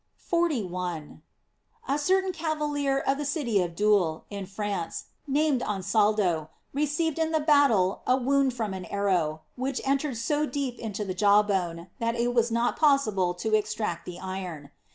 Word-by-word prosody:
f - - -31
41. 180 - -1 0.3
— 465 -1 -31
A 285 - +1
certain 380 +5 +2
cavalier, 300 -4 -1
of 275 0 0
the - - -1
city 280 - 0
of 170 -2 -3
Doul, 200 -5 +2
in 200 -2 -5
France, 195 -3 -4 0.2
named 285 -2 +2
Ansaldo, 200 -5 +1 0.2
received 300 +3 0
in 320 0 +1
the 315 - +2
battle 280 - +3
a 255 - +4
wound 270 0 +2
from 220 -5 -2
an 185 -1 -6
arrow, 175 -5 0
which 260 +1 -2
entered 275 -1 0
so 295 +6 0
deep 275 -5 -3
into 210 -2 -4
the 190 - -3
jaw 205 +2 +5
bone, 175 -4 -2
that 230 0 0
it 240 +1 0
was 235 -1 +3
not 235 +1 0
possible 215 - +3
to 215 +5 -3
extract 210 -5 -1
the 180 -1 -7
iron. 180 -6 -6
225 Hz, 165 wpm, -27 LUFS, 190-285 Hz, 0.3 s, jaw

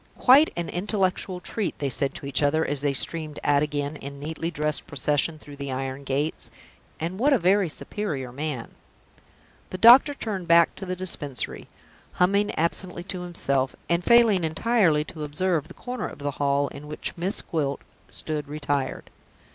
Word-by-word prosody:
"Quite 280 +5 +6
an 170 - -2
intellectual 185 -1 -1
treat!" 210 +3 -3
they 140 -2 -2
said 135 +3 -1
to - - -7
each 140 - 0
other, 155 +2 +2
as 145 -1 -2
they 145 -1 +1
streamed 155 +2 -2
out 145 -1 +3
again 145 0 -2
in 140 0 -8
neatly 160 +3 -3
dressed 150 -2 -2
procession 145 +3 0
through 145 -1 -13
the 140 -1 -5
iron 135 +1 -4
gates. 140 +4 -2 0.5
"And 170 +4 -3
what 280 +4 +4
a - - +5
very 190 0 +3
superior 145 -7 -4
man!" 140 -2 -4 1.0
The 185 - -5
doctor 250 +7 +8
turned 195 -8 -4
back 170 0 +5
to 190 - -7
the 185 - -2
Dispensary, 150 - -4 0.5
humming 200 +3 +2
absently 175 +2 -1
to 185 -1 -6
himself, 140 -7 -1
and 170 +1 +2
failing 230 -6 +5
entirely 165 -2 +2
to 155 0 -8
observe 155 +1 0
the - - -13
corner 250 0 -4
of - - -10
the 145 0 -3
hall 140 0 +2
in 145 +1 -10
which 150 - -5
Miss 180 +4 -2
Gwilt 145 -4 -2 0.3
stood 150 -2 -4
retired. 145 -2 -3
155 Hz, 170 wpm, -25 LUFS, 145-185 Hz, 1.0 s, doctor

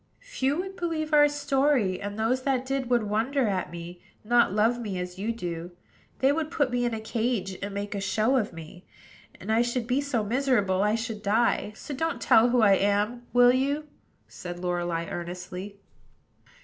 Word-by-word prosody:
"Few 295 - -1
would 380 +1 -5
believe 320 -3 -2
our 295 0 +6
story; 275 -8 +1
and 205 +1 -5
those 235 +4 +1
that 260 -1 0
did 270 -2 -2
would 240 -2 +3
wonder 225 +5 0
at 190 -3 -1
me, 175 +1 -9 0.2
not 235 -1 +3
love 220 +4 +2
me 205 -5 -4
as 180 +1 -6
you 215 +4 -1
do. 175 -5 -5 0.4
They 265 +1 +3
would 310 +1 -1
put 285 -5 0
me 245 0 0
in 235 -2 -1
a - - -4
cage, 220 -3 -2
and 200 +1 -4
make 200 +1 -4
a 200 - -3
show 215 +6 +1
of 230 -6 0
me; 165 +2 -11 0.6
and 200 +4 -4
I 225 +1 +4
should 240 0 -1
be 255 +4 +1
so 265 -6 -1
miserable 215 -5 +1
I 210 +1 +2
should 225 -2 -4
die. 215 0 +1
So 285 - -7
don't 325 +5 -2
tell 225 +2 +5
who 240 -1 +3
I 200 -2 +6
am, 210 +5 0
will 245 0 +6
you?" 280 +4 0 0.4
said 175 -1 -8
Lorelei 175 -1 -2
earnestly. 180 +4 -7
225 Hz, 190 wpm, -27 LUFS, 195-260 Hz, 0.6 s, our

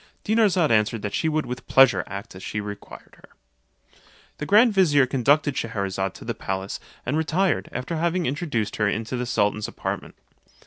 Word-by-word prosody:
Dinarzade 200 - +3
answered 110 0 +2
that 100 - -3
she 160 - 0
would 155 0 0
with 125 0 -7
pleasure 135 -1 +5
act 100 +3 -7
as 95 - -11
she 105 - -4
required 105 -1 -9
her. - - -19 1.1
The 150 - -4
grand 220 +3 +5
vizier 150 -8 +4
conducted 140 +4 +2
Schcherazade 100 -5 -2
to - - -11
the - - -2
palace, 95 0 -4 0.3
and 130 - -1
retired, 160 +4 0
after 130 +7 -4
having 170 +2 0
introduced 130 - -2
her 105 - +2
into 115 +4 -3
the 125 0 -3
sultan's 105 -1 0
apartment. - - -5
125 Hz, 170 wpm, -24 LUFS, 105-160 Hz, 1.1 s, pleasure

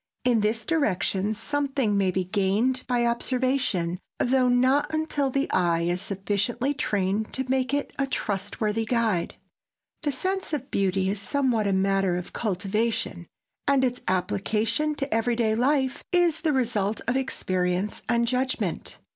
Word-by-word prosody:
In 245 -3 +4
this 215 +2 0
direction 215 - 0
something 270 -2 -1
may 195 -2 +2
be 185 +1 0
gained 205 +7 +1
by 245 -1 +1
observation, 235 -7 0 0.2
though 255 0 +3
not 260 +5 +3
until 310 -3 0
the 275 +2 0
eye 170 -2 +2
is 175 +2 0
sufficiently 205 +7 -1
trained 205 -5 -1
to 265 0 -1
make 260 0 +1
it 285 0 -1
a 275 - +1
trustworthy 210 -1 -1
guide. 220 -7 0 0.7
The 295 - 0
sense 375 +5 -2
of 280 -2 -3
beauty 190 -1 +1
is 200 +1 -1
somewhat 235 -1 +1
a - - +1
matter 195 -1 +2
of 180 - -7
cultivation, 205 -3 -1 0.4
and 275 -2 +4
its 250 0 -2
application 210 - 0
to 275 -3 -3
every 225 +2 +1
day 225 -2 +1
life 265 +3 +1
is 345 -3 +2
the 320 -2 +2
result 220 -6 0
of 240 - +1
experience 185 -6 -1
and 235 0 +2
judgment. 255 +2 -1
230 Hz, 145 wpm, -26 LUFS, 195-265 Hz, 0.7 s, In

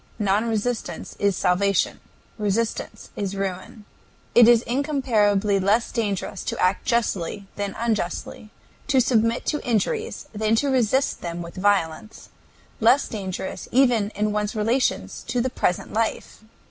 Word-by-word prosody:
Non 210 +2 +1
resistance 220 -5 -3
is 200 -2 +1
Salvation; 190 +1 +1 0.4
Resistance 215 +2 -2
is 200 -1 -3
Ruin. 195 +2 -5 0.5
It 240 -1 +8
is 235 -1 +6
incomparably 220 -7 +1
less 205 +5 +2
dangerous 205 -4 -2
to - - -3
act 185 +2 +1
justly 205 -4 -1
than 200 -1 -3
unjustly, 215 -2 -3 0.4
to 270 -3 +3
submit 230 -1 +2
to 300 - -1
injuries 340 - -1
than 215 +1 +1
to 280 +5 +1
resist 260 +2 +1
them 170 0 -4
with 170 - -9
violence, 200 0 -1 0.5
less 240 +5 +4
dangerous 190 -3 -5
even 245 -5 +3
in 210 0 0
one's 210 0 -2
relations 230 +5 0
to 250 - -1
the 255 +1 0
present 180 - -1
life. 220 0 -2
215 Hz, 135 wpm, -23 LUFS, 195-235 Hz, 0.5 s, It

